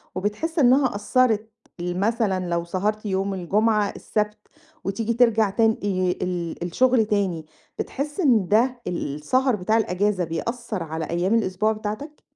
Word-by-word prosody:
وبتحس 215 - -2
إنّها 260 -2 +4
أثرت 220 +1 +1 0.3
ال 175 +1 -3
مثلًا 205 -4 0
لو 170 0 0
سَهرت 205 +5 -2
يوم 195 0 -1
الجمعة، 205 +3 +1
السبت، 210 0 -2 0.5
وتيجي 220 +4 -1
ترجع 225 -3 +3
تان 225 +2 +3
آآ - - 0 0.4
ال 175 -2 -3
الشغل 235 +6 +3
تاني، 195 -7 -1 0.3
بتحس 290 +5 -4
إن 240 - +3
ده 240 +4 +2
ال 150 -5 -3
السهر 255 - +1
بتاع 215 +4 +1
الأجازة، 200 -2 +1
بيأثر 210 +4 -3
على 160 0 -4
أيّام 175 +5 +1
الأسبوع 215 0 +1
بتاعتك؟ 215 +8 -5
210 Hz, 140 wpm, -24 LUFS, 185-230 Hz, 0.5 s, إنّها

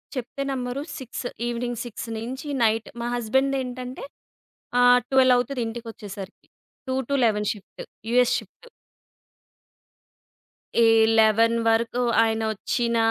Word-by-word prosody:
చెప్తే 255 +2 -5
నమ్మరు, 255 0 -3 0.2
6 255 -1 -7 0.2
evening 240 0 -3
6 235 0 -7
నించీ 260 +6 -6
night 225 0 +1
మా 235 - -2
హస్బెండేంటంటే, 255 +1 -1 0.8
ఆహ్, 245 0 +6
12 260 -1 +5
అవుతది 250 +1 -1
ఇంటికొచ్చేసరికి. 215 -4 -8 0.4
2-11 250 -5 +1
షిఫ్టు. 200 -4 -11 0.3
US 245 0 +4
shift. 485 - -13 2.1
ఏ 230 -1 +5 0.3
11 225 +1 +4
వరకు 230 +2 +1 0.2
ఆయనొచ్చిన 225 +2 -1
240 Hz, 95 wpm, -24 LUFS, 225-255 Hz, 2.1 s, ఆహ్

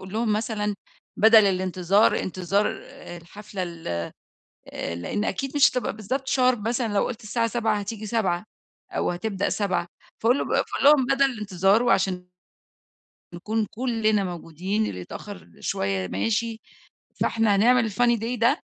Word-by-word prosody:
قل 190 +1 -10
لهم 220 -1 0
مثلًا 210 -1 -1 0.4
بدَل 220 0 +7
الإنتظار، 185 +1 +2
إنتظار 190 +3 0
آآ 175 - -10
الحفلة 195 +3 -8
ال 170 -2 -7 0.8
آآ 85 - -5
لإن 205 - -3
أكيد 275 +1 -3
مش 285 - +6
هتبقى 250 -4 -2
بالضبط 260 +6 -3
sharp 255 -1 +3
مثلًا 235 -3 -1
لو 200 - +2
قُلت 230 -3 -7
الساعة 230 +2 0
19:00 225 -1 0
هتيجي 210 +1 -6
19:00 200 -4 -1 0.5
أو - - -1
هتبدأ 195 +2 -2
19:00، 180 -4 -1 0.3
فقُل 245 +5 +2
بأ - - +2
فقُل - - -4
لهم 285 -3 +7
بدل 275 +1 +3
الإنتظار 210 -3 +1
وعشان 190 -6 +1 1.1
نكون 215 +5 -2
كلّنا 220 -3 0
موجودين، 180 +4 -3
اللي 90 - -5
يتأخّر 85 -1 -9
شوية 95 -1 -2
ماشي، 225 - -1 0.6
فإحنا 225 -3 +2
هنعمل 230 +1 +4
الfunny 240 +3 +2
day 235 +3 -3
ده، 240 +7 +3
210 Hz, 145 wpm, -25 LUFS, 185-230 Hz, 1.1 s, بدَل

